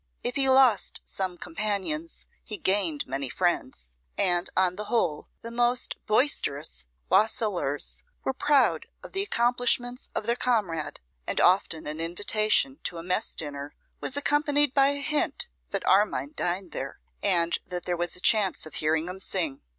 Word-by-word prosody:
If 245 - -2
he 270 -1 +3
lost 260 -5 +4
some 185 -2 -3
companions, 215 - -2 0.2
he - - -4
gained 190 - +2
many 135 0 -4
friends; 130 - -2 0.2
and, 175 -1 +2
on 185 -1 +3
the 210 +2 -5
whole, 175 -10 -1 0.2
the 230 - -7
most 240 +1 +2
boisterous 140 - +1 0.2
wassailers 200 - 0 0.2
were 265 - -1
proud 285 0 +2 0.2
of - - -10
the 390 - 0
accomplishments 245 - +1
of - - -2
their 235 +1 +1
comrade; 205 -12 -1 0.3
and - - 0
often 175 -3 +2
an 150 +1 -5
invitation 215 - +2
to 170 - -1
a 165 - -6
mess 185 +5 0
dinner 145 -2 -3 0.2
was 265 - -1
accompanied 290 -1 +2
by 275 -1 +5
a 285 0 0
hint 300 +1 -1 0.2
that - - -3
Armine 185 -8 +2
dined 180 +1 -2
there, 135 +1 -6 0.2
and 170 -4 +2
that 180 -1 -4
there 180 - -1
was 175 0 -2
a - - -1
chance 195 -3 +3
of 155 - -8
hearing 155 +2 0
him 185 +1 -6
sing. 170 -8 0
195 Hz, 160 wpm, -26 LUFS, 165-245 Hz, 0.3 s, by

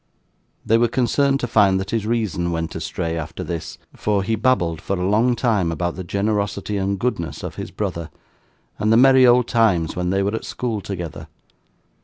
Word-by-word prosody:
They 115 +1 +3
were 120 - +4
concerned 135 +3 +1
to 120 - -1
find 100 -4 +4
that 95 +1 -5
his 110 -2 -1
reason 105 -7 -1
went 80 -1 -3
astray 80 0 -3
after 80 -2 -5
this; 85 -2 -5 0.2
for 105 -2 0
he 115 - -1
babbled, 90 -9 +1
for 95 +1 -2
a 90 - 0
long 115 +5 +3
time, 110 -8 +1
about 85 +1 -2
the 95 - -6
generosity 100 +2 -1
and 100 0 -1
goodness 95 -6 -3
of - - -5
his - - -6
brother, 85 -2 -4 0.7
and 105 +1 +1
the 115 - +6
merry 130 0 +7
old 120 0 +4
times 100 -9 +2
when 90 0 -1
they 95 +1 +1
were 100 +2 -1
at 110 - -3
school 115 -4 -3
together. 85 -5 -6
100 Hz, 190 wpm, -21 LUFS, 85-115 Hz, 0.7 s, merry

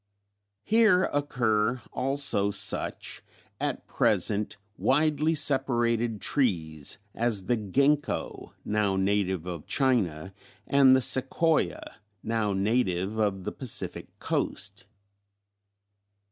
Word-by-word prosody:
Here 215 -4 +4
occur 120 -5 0
also 135 -7 0
such, 100 - -2 0.4
at - - -3
present, 105 0 0 0.2
widely 155 +3 +1
separated 120 -6 +1
trees 80 - 0 0.2
as 115 -5 0
the 120 - +1
gingko 140 +8 -1
now 105 -2 0
native 95 -2 0
of 85 -4 -7
China, 95 - 0 0.3
and 135 -2 +5
the 130 - +2
Sequoia 135 +5 0 0.2
now 110 -2 -1
native 100 -1 0
of 100 -3 0
the - - -4
Pacific - - -3
Coast. 100 +2 -3
115 Hz, 90 wpm, -27 LUFS, 100-135 Hz, 0.4 s, and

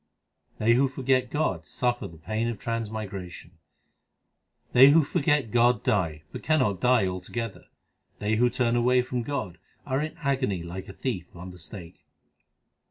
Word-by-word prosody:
They 115 +2 +3
who 135 +3 +4
forget 130 -1 0
God 150 +3 -1
suffer 120 -4 -1
the 85 -3 -13
pain 110 +8 -2
of 120 -2 -3
transmi 110 -1 -3
gration: 95 -3 -9 1.2
They 130 +3 +9
who 160 +2 +6
forget 145 -4 +1
God 120 -1 +3
die, 80 -3 0
but - - -7
cannot 130 - +1
die 125 -5 +4
altogether; 95 +5 -5 0.5
They 105 +1 0
who 120 +2 +4
turn 120 -1 +1
away 125 +1 +3
from 125 0 -3
God, 115 -8 -4 0.3
arc 130 +2 0
in 155 +1 -6
agony 130 - 0
like 90 +2 -7
a - - -8
thief 95 -7 -3
on 90 +2 -8
the 90 - -13
stake. 85 0 -10
115 Hz, 160 wpm, -27 LUFS, 95-130 Hz, 1.2 s, They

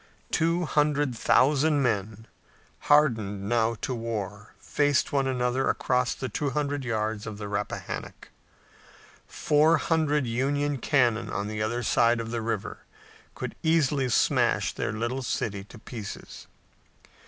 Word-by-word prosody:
Two 170 +2 +1
hundred 145 -3 +1
thousand 145 +5 +3
men, 110 -2 -1 0.6
hardened 110 -10 +3
now 115 0 +1
to 130 - -2
war, 105 -3 -5
faced 145 -2 +1
one 135 -1 +2
another 125 0 0
across 125 -1 0
the 130 - -4
two 140 +5 -2
hundred 145 0 -2
yards 110 -2 -2
of 105 -2 -6
the 105 -1 -6
Rappahannock. 105 0 -5 1.0
Four 155 +2 +3
hundred 150 -3 +1
Union 140 +4 0
cannon 120 -5 +2
on 100 0 -3
the 105 0 -4
other 120 +3 -1
side 120 +1 +3
of 115 0 -5
the 120 -1 -2
river 110 -2 -3 0.6
could - - -5
easily 150 -5 +2
smash 115 - +2
their - - -2
little 120 +4 -2
city 100 -5 -2
to 115 - -14
pieces. 110 -3 -9
125 Hz, 130 wpm, -27 LUFS, 110-145 Hz, 1.0 s, thousand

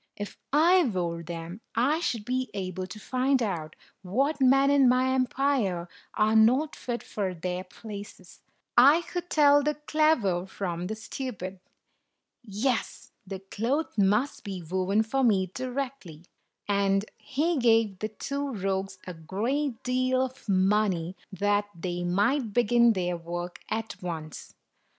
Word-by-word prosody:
"If 205 0 -6 0.2
I 345 +6 +5
wore 175 -7 -2
them, 170 +4 -7
I 275 +8 +2
should 230 -10 -2
be 255 0 -1
able 185 -1 -4
to 185 +4 -9
find 255 +3 +1
out 165 -7 -3 0.3
what 270 +11 0
men 270 +2 +5
in 275 -3 +5
my 255 +1 +3
empire 255 -9 0 0.3
are 215 +1 +3
not 255 +8 +4
fit 240 -1 -4
for 190 -3 -3
their 180 +2 -3
places; 200 -2 -10 0.3
I 285 +8 +7
could 355 0 -5
tell 290 -1 +5
the 300 +1 0
clever 300 - +1
from 180 -3 -4
the 220 - -3
stupid. 210 -5 -6 0.8
Yes, 230 +2 -2 0.2
the 190 0 -6
cloth 265 +9 -1
must 210 +7 +1
be 190 -4 -6
woven 190 +5 +1
for 265 +5 0
me 190 -6 +2
directly." 255 - -5 0.4
And 200 0 +2
he 305 +3 0
gave 225 -5 +3
the 215 - -2
two 280 +6 -4
rogues 195 -1 -2
a 180 - -6
great 225 - -2
deal 255 +1 +1
of 260 -3 -11
money, 190 -2 +2 0.2
that 205 +2 +1
they 175 0 -3
might 205 +7 +1
begin 235 0 +4
their 180 -3 -1
work 175 +1 -6
at 225 0 -4
once. 160 -4 -6
215 Hz, 140 wpm, -27 LUFS, 185-260 Hz, 0.8 s, I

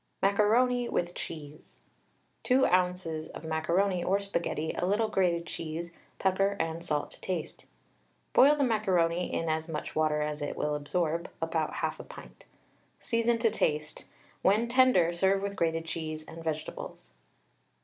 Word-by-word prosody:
MACARONI 235 +5 +3
WITH 175 0 -1
CHEESE. 155 -3 -8 0.7
2 265 +1 +4
oz. 180 0 +2 0.3
of - - -8
macaroni 170 +4 +1
or 195 +2 +2
Spaghetti, 170 -5 -2
a - - -3
little 210 +4 +1
grated 175 -4 +1
cheese, 165 +1 -5 0.3
pepper 195 +1 +1
and 165 +1 -2
salt 150 -4 -2
to - - -12
taste. 180 -5 -4 0.7
Boil 290 +3 +7
the 290 - +1
macaroni 180 -7 +1
in 165 - -1
as 160 +1 -1
much 155 - -4
water 155 -1 +2
as 150 0 -3
it 145 - -3
will 150 - 0
absorb 165 +3 -1
(about 165 -1 -1
1/2 - - -3
pint). - - -12 0.5
Season 230 0 +1
to 230 -1 +2
taste. 150 0 -1 0.4
When 215 +5 +3
tender 240 -9 +4
serve 195 +3 +2
with 200 0 -3
grated 165 -2 0
cheese 155 -1 -4
and 165 0 -9
vegetables. 155 - -5
170 Hz, 145 wpm, -29 LUFS, 160-200 Hz, 0.7 s, Boil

